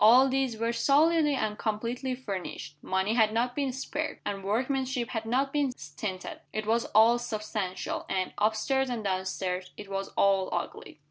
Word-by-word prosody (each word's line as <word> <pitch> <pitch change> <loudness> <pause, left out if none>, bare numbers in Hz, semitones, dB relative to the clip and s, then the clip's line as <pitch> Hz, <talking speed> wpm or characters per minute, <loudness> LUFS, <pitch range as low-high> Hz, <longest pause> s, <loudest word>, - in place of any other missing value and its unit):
All 250 +5 +8
these 260 -3 0
were 230 +1 0
solidly 300 +3 +4
and 215 -4 -2
completely 240 +4 -2
furnished. 195 - -5
Money 190 +3 0
had 220 -2 +4
not 240 +2 0
been 280 -2 0
spared, 290 +4 -3
and 195 -1 -3
workmanship 255 +3 0
had 225 -1 -3
not 270 +4 +1
been 290 -3 +2
stinted. 185 +4 -6
It 215 0 -3
was 230 +2 +2
all 230 +2 +7
substantial 215 -5 -3
and, 185 -1 -1
up 215 +1 +3
stairs 265 +4 +1
and 235 -3 -3
down 190 -1 0
stairs, 185 -1 -2
it 205 -1 -9
was 195 0 -2
all 195 -1 +3
ugly. 175 -2 -4
225 Hz, 175 wpm, -29 LUFS, 195-260 Hz, -, All